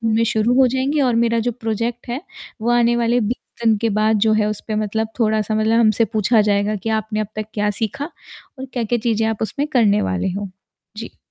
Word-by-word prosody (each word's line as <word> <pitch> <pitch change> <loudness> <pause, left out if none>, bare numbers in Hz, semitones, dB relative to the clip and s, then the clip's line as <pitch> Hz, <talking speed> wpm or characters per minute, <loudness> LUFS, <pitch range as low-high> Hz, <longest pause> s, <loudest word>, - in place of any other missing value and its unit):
में 230 - +3
शुरू 225 +2 +1
हो 260 - +6
जाएँगे 265 +4 0
और 250 -3 +2
मेरा 230 0 +1
जो - - +2
प्रोजेक्ट 230 +1 -3
है, 255 +6 -3 0.4
वो 235 - 0
आने 240 0 +3
वाले 240 +1 +2
20 235 +1 -5
दिन 225 -2 +4
के 225 +1 0
बाद 215 0 +3
जो 220 - +4
है 215 -1 +2
उस 215 - -4
पे 215 - -2
मतलब 215 +1 -1
थोड़ा-सा 215 -1 +1
मतलब 220 +1 +2
हमसे 225 0 +3
पूछा 220 +1 +2
जाएगा 205 0 +1
कि 215 +2 -4
आपने 215 0 -4
अब 215 - -2
तक 215 -1 -3
क्या 210 -1 0
सीखा 225 +7 -2 0.5
और 265 - -5
क्या-क्या 240 -1 -1
चीज़ें 225 -1 +1
आप 225 -1 -3
उसमें 275 +7 -2
करने 210 -5 +4
वाले 95 - -1
हो। 200 -1 -4 0.5
जी। 230 - -8
225 Hz, 220 wpm, -20 LUFS, 215-235 Hz, 0.5 s, हो